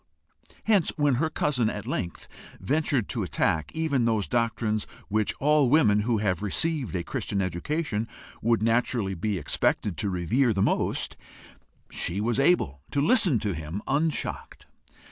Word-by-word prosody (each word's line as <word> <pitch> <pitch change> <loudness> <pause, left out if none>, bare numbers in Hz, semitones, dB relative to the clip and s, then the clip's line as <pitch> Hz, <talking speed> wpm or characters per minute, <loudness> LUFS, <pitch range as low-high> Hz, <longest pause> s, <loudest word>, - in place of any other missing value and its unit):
Hence, 205 -7 +3
when 145 -4 +2
her 160 - +1
cousin 135 -7 0
at 105 -1 -5
length 90 -9 -4 0.3
ventured 140 -5 0
to 120 - -2
attack 80 -2 0
even 150 -6 +1
those 110 -3 +1
doctrines 115 -2 0 0.2
which 110 0 0
all 150 -2 +3
women 120 -8 +4
who 115 +2 +1
have 100 -2 0
received 135 - -1
a 85 - -1
Christian 100 - -3
education 110 - -2 0.3
would 115 -1 +2
naturally 115 -3 +1
be 100 +3 -2
expected 85 +3 0
to 100 - -1
revere 110 +8 +1
the 95 -1 +1
most, - - 0 0.7
she 90 +3 -1
was 115 +4 0
able 135 - +2
to 145 - -1
listen 180 - +4
to 105 -2 -1
him 80 +5 -6
unshocked. 150 +3 -2
115 Hz, 145 wpm, -26 LUFS, 100-140 Hz, 0.7 s, women